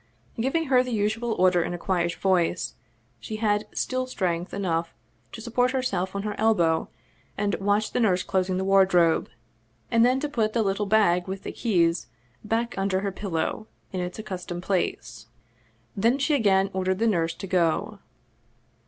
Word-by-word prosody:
Giving 270 +8 0
her 260 -3 +4
the 250 - -4
usual 220 +1 0
order 180 -2 +3
in 175 - -2
a - - -5
quiet 175 -1 -1
voice, 180 -2 +1 0.5
she 215 - -6
had 210 -1 0
still 255 0 -2
strength 180 -6 -2
enough 170 -4 -2 0.4
to 225 - -8
support 245 +2 +1
herself 195 -8 -1
on 200 - -2
her 210 0 -2
elbow 175 -8 +2 0.5
and 205 0 0
watch 205 +2 +1
the - - -1
nurse 185 -6 +2
closing 185 -1 0
the 190 - -1
wardrobe, 190 -4 +3 0.6
and 230 0 +4
then 255 +2 +3
to 295 - -2
put 225 -7 -1
the 230 - +2
little 200 +1 -1
bag 195 -4 +3
with 190 0 -5
the - - -5
keys 170 -7 +1 0.4
back 230 +2 -1
under 195 -1 0
her 200 0 -2
pillow, 195 +2 -3 0.3
in 185 - -2
its 180 0 -4
accustomed 180 -4 -6
place. 180 - -2 0.7
Then 230 +6 +2
she 285 +2 +1
again 195 -7 +3
ordered 185 0 0
the 225 - +1
nurse 170 -7 +1
to 195 - -7
go. 180 +2 0
195 Hz, 170 wpm, -25 LUFS, 180-225 Hz, 0.7 s, her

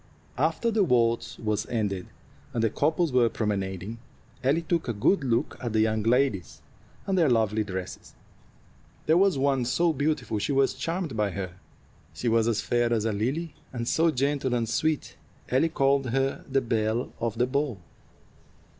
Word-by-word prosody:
After 160 - +1
the 215 -2 +3
waltz 115 -7 +1
was 105 -2 -2
ended, 100 -6 -2 0.5
and 115 - +1
the 115 - +2
couples 155 +4 +1
were 120 -2 +4
promenading, 100 0 -3 0.4
Ellie 145 +6 +2
took 165 -2 -1
a 120 - 0
good 140 - +2
look 120 -3 0
at 120 -3 -3
the 110 - +2
young 110 0 +1
ladies 115 -4 0 0.4
and 195 - 0
their 165 -6 +4
lovely 110 -2 +2
dresses. 95 -3 -7 0.9
There 160 - +4
was 190 -3 +4
one 135 -1 +2
so 165 +7 +2
beautiful 140 -6 -1
she 140 - -1
was 135 -1 +3
charmed 165 +2 -3
by 105 -1 +1
her. 95 -2 -4 0.6
She 125 - -3
was 115 0 +3
as 115 -1 +1
fair 120 +1 +1
as 110 -2 +1
a 110 - +1
lily, 135 +10 -2 0.2
and 120 -2 -4
so 165 +5 +3
gentle 135 -2 0
and 115 -1 0
sweet 155 +6 -1 0.3
Ellie 135 +6 +3
called 135 -3 +2
her 135 +2 0
the 135 0 +2
belle 115 +1 -1
of 115 -1 -2
the 125 - +3
ball. 140 -2 -1
125 Hz, 170 wpm, -27 LUFS, 110-145 Hz, 0.9 s, were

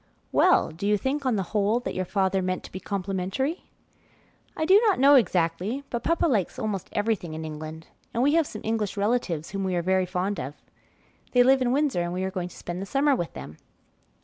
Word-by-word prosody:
"Well, - - +4
do 170 +6 -4
you 210 0 +3
think, 270 +5 -2
on 250 - +2
the 195 - 0
whole, 210 +2 +2
that - - -4
your 185 - -2
father 190 0 +1
meant 185 0 -2
to - - -11
be 185 - -6
complimentary?" 195 - -3 0.9
"1 315 - -1
do 385 +5 +6
not 405 - +3
know 275 +2 +6
exactly, 185 +2 +2
but 235 - -2
papa 335 0 +1
likes 220 - 0
almost 205 -4 -3
everything 205 -7 -1
in 160 0 -5
England, 155 +1 -7 0.3
and 235 - 0
we 290 +2 +3
have 325 -2 +3
some 215 - -8
English 220 -2 -2
relatives 200 -7 -1
whom 195 0 -3
we 185 -1 -1
are 175 - 0
very 185 +1 +2
fond 185 +2 -2
of. 135 +3 -5 0.8
They 245 -1 +6
live 265 +1 +4
in 245 -1 +2
Windsor, 275 -8 +1
and 175 0 -2
we 185 +1 -2
are 190 - -2
going 180 -2 -4
to - - -14
spend 175 +1 -5
the 195 - -5
summer 280 +3 +2
with 170 -8 -4
them." 70 +4 -9
200 Hz, 220 wpm, -26 LUFS, 180-250 Hz, 0.9 s, do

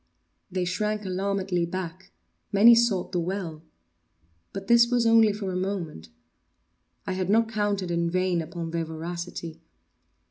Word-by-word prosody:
They 185 -1 -2
shrank 210 +3 -2
alarmedly 190 -1 -1
back; 185 0 -6 0.4
many 215 +4 +8
sought 230 -6 +2
the 180 - 0
well. 170 -3 -4 0.9
But 195 0 -6
this 235 +2 +5
was 245 -1 +2
only 225 -1 +6
for 200 -2 -4
a - - -4
moment. 180 - -4 1.0
I - - -3
had 185 0 -2
not 225 +2 +3
counted 205 -4 -1
in 170 0 0
vain 185 -1 +1
upon 165 +1 -6
their 165 -1 -1
voracity. 165 0 -6
185 Hz, 140 wpm, -26 LUFS, 170-205 Hz, 1.0 s, many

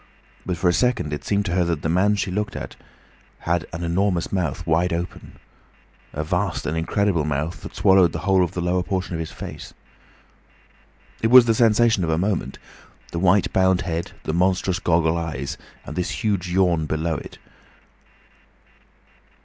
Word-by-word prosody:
But 90 -2 -2
for 90 +2 0
a 85 - +4
second 100 -6 0
it 75 - -5
seemed 100 0 0
to 90 - -2
her 90 0 +2
that 85 -3 -2
the - - 0
man 95 +5 +2
she 100 -2 -2
looked 105 +2 -2
at - - -6 0.7
had 85 -1 -1
an 85 +1 -5
enormous 90 +1 0
mouth 85 -3 -2
wide 85 +2 +1
open—a 85 -2 -8
vast 75 - -2
and 75 - -2
incredible 85 +1 0
mouth 75 +3 -3
that - - -10
swallowed 95 -3 +5
the - - -4
whole 95 -2 +4
of 85 - -3
the 90 - -3
lower 90 +1 +1
portion 95 -1 -3
of 85 - -3
his 80 - -5
face. - - -9 1.5
It 110 - +2
was 125 0 +9
the 115 - +3
sensation 115 -2 +3
of 80 - -1
a 80 - +1
moment: 95 +2 -1 0.5
the 85 - -3
white 95 +2 +3
bound 95 -1 +3
head, 85 -1 -4
the 80 - -3
monstrous 90 +1 +1
goggle 85 -2 +2
eyes, 70 -5 -4 0.3
and 75 - -7
this 90 +6 -3
huge 100 -5 0
yawn 85 -4 +2
below 80 +1 -1
it. - - -10
90 Hz, 175 wpm, -22 LUFS, 80-95 Hz, 1.5 s, was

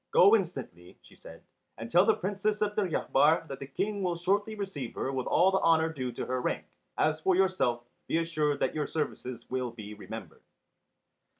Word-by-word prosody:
"Go 200 +4 +7
instantly," 135 - -4
she - - -18
said, - - -13 0.3
"and 115 +1 -7
tell 180 +3 +5
the - - +5
Princess 205 +2 -1
of 210 0 -2
Deryabar 160 -5 +2
that 135 - -7
the 135 - -7
King 200 +8 -2
will 180 -2 0
shortly 200 +5 0
receive 190 - -5
her 135 - -2
with 130 -2 -3
all 185 +3 +4
the 190 - +2
honour 160 -1 +3
due 130 -4 -3
to - - -4
her 130 0 -2
rank. - - -2 0.3
As 155 0 +1
for 185 +2 +3
yourself, 180 -11 +1 0.2
be - - +1
assured 155 -3 0
that - - +1
your 150 -2 -2
services 130 -6 -4
will 130 -1 -1
be 105 -3 -9
remembered." 105 - -9
160 Hz, 190 wpm, -29 LUFS, 130-190 Hz, 0.3 s, Go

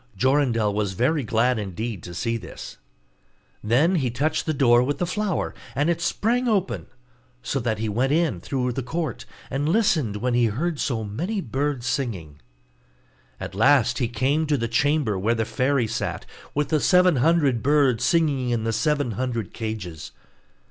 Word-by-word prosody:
Jorindel 120 -3 +2
was 100 -2 -1
very 140 - +1
glad 115 +2 +1
indeed 105 +1 -4
to 85 - -9
see 115 +5 -1
this. 115 - -9 0.8
Then 140 - +3
he 130 -5 0
touched 140 +9 -1
the - - +2
door 120 -3 +5
with 140 +3 -1
the 175 - -1
flower, 195 0 -2 0.2
and 145 +5 +2
it 170 0 -2
sprang 240 +8 0
open; 200 -5 0 0.6
so 135 - -1
that 115 -3 -1
he 110 +1 -2
went 120 +6 0
in 155 - +1
through 125 +3 -2
the 135 - -3
court, 155 0 -4 0.3
and 145 +3 -1
listened 165 - +2
when 125 +3 -1
he 120 0 +3
heard 150 +8 -2
so 115 -5 -1
many 170 - -3
birds 135 - -2
singing. 105 - -3 1.0
At - - -6
last 125 +3 +3
he 120 - +1
came 135 +7 0
to 145 -1 +2
the 115 -2 -1
chamber 125 -3 +1
where 115 +5 +1
the 110 -1 -1
fairy 130 +2 +1
sat, 110 - -3 0.3
with 145 -1 0
the 155 - +2
seven 180 -1 +4
hundred 145 -4 +2
birds 135 -4 +3
singing 145 -5 +2
in 120 -2 0
the 115 0 -1
seven 145 -2 0
hundred 115 -1 -3
cages. 105 -8 -6
130 Hz, 170 wpm, -24 LUFS, 115-150 Hz, 1.0 s, door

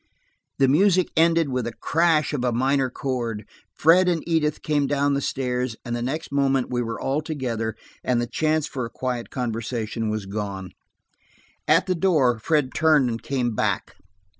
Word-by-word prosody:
The 135 - +4
music 185 +5 +3
ended 165 -1 +3
with 125 -2 -1
the 120 - -4
crash 160 0 +1
of 135 -4 -1
a 125 - +1
minor 130 +2 +1
chord. 120 -5 -3 0.3
Fred 180 +4 +5
and 170 -2 -1
Edith 155 -3 0
came 145 -2 +1
down 145 0 +1
the 140 - 0
stairs, 125 -3 -2
and 120 -1 -2
the 120 - -3
next 140 +7 -3
moment 135 -2 +1
we 120 -1 0
were 115 -1 -4
all 140 +3 -1
together, 120 -8 -3 0.3
and 125 -1 +1
the 120 - 0
chance 155 +5 0
for 130 -5 -4
a 115 - -4
quiet 125 -1 -4
conversation 115 -2 -3
was 105 -2 -3
gone. 95 -2 -5 1.0
At - - +4
the 185 - +1
door 155 -10 +2
Fred 145 +1 0
turned 155 -6 +3
and 115 - -4
came 125 -4 -1
back. - - -1
130 Hz, 175 wpm, -24 LUFS, 120-155 Hz, 1.0 s, Fred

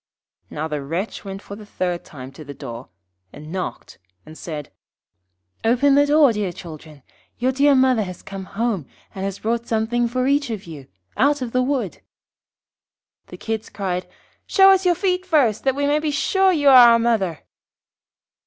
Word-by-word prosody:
Now 155 +2 -4
the 150 -2 -4
wretch 170 +10 -4
went 195 0 -8
for 200 - -9
the 215 - -11
third 180 -4 -3
time 130 -2 -11
to 145 +3 -12
the 145 -1 -10
door, 125 -3 -9 0.4
and 150 +2 -11
knocked, 185 0 -6 0.3
and 155 - -12
said 155 -3 -7 0.9
'Open 250 +5 +3
the 285 +1 +4
door, 290 -4 +5 0.2
children. 155 -4 -11 0.3
Your 255 +1 +1
dear 280 +2 +3
mother 260 -3 +3
has 185 -3 -7
come 195 -1 -8
home, 210 - -2 0.3
and 190 - -6
has 195 0 -3
brought 235 +1 -2
something 230 +2 0
for 255 +2 -1
each 285 0 +1
of 215 -4 -5
you 150 -6 -10 0.3
out 285 0 +2
of 240 - -5
the 255 - +1
wood.' 255 - -2 1.3
The - - -11
Kids 220 -1 -4
cried, 185 -3 -3 0.4
'Show 390 -1 +6
us 380 -1 +3
your 350 - +4
feet 365 0 0
first, 275 - +1
that 265 -1 +2
we 285 0 -1
may 295 +1 +2
be 305 0 -2
sure 380 +6 +2
you 290 -5 +3
are 250 -3 +9
our - - +5
mother.' 220 -8 0
225 Hz, 175 wpm, -21 LUFS, 180-275 Hz, 1.3 s, are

